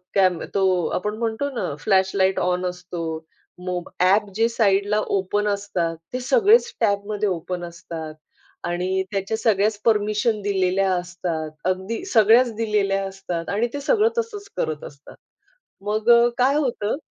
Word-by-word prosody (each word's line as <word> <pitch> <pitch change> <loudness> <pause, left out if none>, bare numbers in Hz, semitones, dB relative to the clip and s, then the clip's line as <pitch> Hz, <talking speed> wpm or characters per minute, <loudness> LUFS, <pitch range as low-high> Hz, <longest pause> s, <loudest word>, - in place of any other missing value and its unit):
Cam 185 -4 +3
अ, - - -4
तो 185 -3 +2
आपण 210 +3 -2
म्हणतो 230 +5 -2
ना - - -2
फ्लॅश 190 -2 +2
लाइट 190 0 +2
ऑन 180 0 0
असतो, 180 -1 -5 0.6
मोब 180 -1 -3
ॲप 200 +3 +3
जे 225 +1 +3
साइडला 205 -2 +2 0.2
ओपन 205 +2 -1
असतात 185 -5 -1 0.2
ते 255 - -1
सगळेच 470 - +4
टॅबमध्ये 205 -1 0
ओपन 180 0 -4
असतात 170 -2 -7 0.5
आणि 185 +2 -1
त्याच्या 200 +2 -2
सगळ्याचं 210 -1 +1
परमिशन 215 0 +2
दिलेल्या 190 -1 +1
असतात, 175 -3 -3
अगदी 190 - -2
सगळ्याच 230 - +5
दिलेल्या 205 -3 0
असतात 180 -3 -5
आणि 215 +4 +1
ते 285 - -4
सगळं 435 - +3
तसंच 425 -3 -3
करत 155 -2 -2
असतात. 140 0 -12 0.7
मग 215 +2 +1 0.3
काय 260 +3 +3
होतं? 245 -7 -1
200 Hz, 140 wpm, -23 LUFS, 180-220 Hz, 0.7 s, सगळ्याच